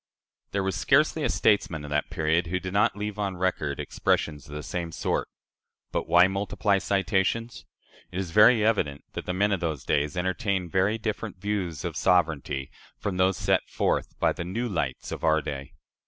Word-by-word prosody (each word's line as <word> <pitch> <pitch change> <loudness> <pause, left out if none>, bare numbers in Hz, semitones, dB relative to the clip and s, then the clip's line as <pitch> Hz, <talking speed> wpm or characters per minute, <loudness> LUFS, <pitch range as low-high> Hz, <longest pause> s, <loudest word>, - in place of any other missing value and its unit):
There 100 -1 -1
was 95 -2 -1
scarcely 155 +9 +3
a 130 - +1
statesman 90 -10 +2
of 75 - -8
that 75 0 0
period 80 +2 +1
who 90 +2 -1
did 95 0 -6
not 100 - +3
leave 105 0 -4
on 100 -3 -2
record 85 -6 -1
expressions 75 -2 -1
of 75 - -8
the 75 - -5
same 85 +1 -4
sort. - - -1 0.6
But - - -2
why 90 +1 +6
multiply 100 +1 0
citations? 100 +4 0 0.5
It 90 - -6
is 95 -3 -3
very 105 +3 +6
evident 75 -11 +1
that - - -6
the 90 - -1
"men 100 +2 +2
of 100 - +1
those 80 -5 -3
days" 75 +3 0
entertained 95 -1 -1
very 100 +5 +2
different 110 -2 -4
views 90 -6 -3
of - - -3
sovereignty 75 -7 +1 0.3
from 100 -3 -3
those 95 -1 +3
set - - +1
forth - - -1
by - - +3
the - - -5
"new 110 +8 -2
lights" 75 - -3
of - - -6
our 80 0 +4
day. 70 -3 -6
95 Hz, 185 wpm, -27 LUFS, 80-100 Hz, 0.6 s, why